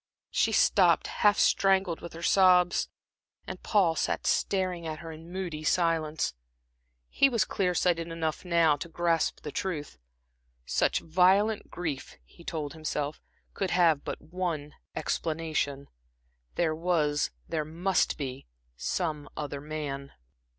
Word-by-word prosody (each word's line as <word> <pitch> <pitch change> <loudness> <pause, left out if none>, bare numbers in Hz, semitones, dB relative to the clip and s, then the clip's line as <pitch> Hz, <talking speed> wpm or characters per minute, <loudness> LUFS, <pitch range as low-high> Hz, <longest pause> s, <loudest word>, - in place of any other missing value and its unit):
She - - +2
stopped, - - +4
half 205 -1 +3
strangled 190 -3 +3
with 170 - -8
her 165 +1 -8
sobs, 180 -1 +4 0.6
and - - -7
Paul 185 -6 +3
sat - - -1
staring 185 -4 0
at 155 -1 -4
her 165 +1 -8
in 160 +2 -11
moody 175 -5 -4
silence. 160 - +1 0.7
He 275 - +4
was 230 -7 +2
clear 185 -3 0
sighted 170 -1 +1
enough 165 -1 -3
now 170 -4 +3
to 170 - -7
grasp 165 -1 0
the 150 - -6
truth. 155 - -4 0.7
Such - - +1
violent 190 +6 +3
grief, 160 -6 -5
he 170 - -17
told 150 -4 -4
himself, 150 -1 -3 0.3
could 195 - -2
have 170 -5 +3
but - - -5
one 165 -4 -4 0.2
explanation. 155 -4 -2 0.7
There 165 -2 +1
was, 155 -3 +1 0.2
there 160 -2 -1
must 170 +4 0
be, 130 - -5 0.3
some 150 - -2
other 145 -2 -4
man. 145 -2 -5
165 Hz, 130 wpm, -29 LUFS, 155-180 Hz, 0.7 s, stopped